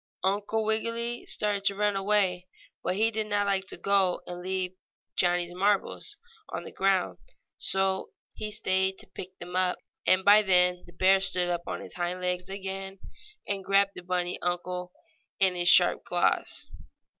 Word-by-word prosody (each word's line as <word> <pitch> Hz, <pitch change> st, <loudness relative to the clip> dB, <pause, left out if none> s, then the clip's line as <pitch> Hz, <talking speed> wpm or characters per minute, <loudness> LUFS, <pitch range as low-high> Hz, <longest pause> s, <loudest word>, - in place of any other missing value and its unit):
Uncle 205 Hz, +3 st, 0 dB
Wiggily 230 Hz, +2 st, -1 dB
started 205 Hz, -2 st, 0 dB
to 200 Hz, 0 st, +3 dB
run 205 Hz, 0 st, +1 dB
away, 195 Hz, -2 st, +1 dB, 0.4 s
but 180 Hz, -, 0 dB
he 220 Hz, +3 st, +2 dB
did 215 Hz, -1 st, -2 dB
not 205 Hz, -1 st, +1 dB
like 195 Hz, -1 st, 0 dB
to -, -, -5 dB
go 195 Hz, -2 st, +2 dB
and 175 Hz, 0 st, -7 dB
leave 185 Hz, 0 st, -2 dB, 0.4 s
Johnnie's 175 Hz, -1 st, +1 dB
marbles 200 Hz, -, 0 dB, 0.3 s
on -, -, -5 dB
the -, -, -9 dB
ground, 195 Hz, -1 st, +1 dB, 0.4 s
so 190 Hz, 0 st, 0 dB, 0.2 s
he 215 Hz, -, -4 dB
stayed 190 Hz, -1 st, +1 dB
to -, -, -7 dB
pick 185 Hz, +1 st, -9 dB
them 175 Hz, +1 st, -8 dB
up, 185 Hz, -1 st, +1 dB, 0.3 s
and 185 Hz, 0 st, +4 dB
by 205 Hz, +1 st, +8 dB
then 180 Hz, -2 st, +3 dB
the 175 Hz, -, -15 dB
bear 190 Hz, +2 st, +4 dB
stood 180 Hz, -2 st, +1 dB
up 175 Hz, 0 st, -3 dB
on -, -, -4 dB
his -, -, -10 dB
hind 180 Hz, +1 st, -3 dB
legs 180 Hz, 0 st, -2 dB
again, 195 Hz, 0 st, -5 dB, 0.5 s
and 200 Hz, -1 st, -2 dB
grabbed 195 Hz, +1 st, +3 dB
the 180 Hz, -, -9 dB
bunny 180 Hz, 0 st, -2 dB
uncle 180 Hz, 0 st, -3 dB, 0.5 s
in 190 Hz, -1 st, +4 dB
his 175 Hz, -1 st, +2 dB
sharp -, -, +6 dB
claws. -, -, 0 dB
190 Hz, 165 wpm, -28 LUFS, 180-200 Hz, 0.5 s, by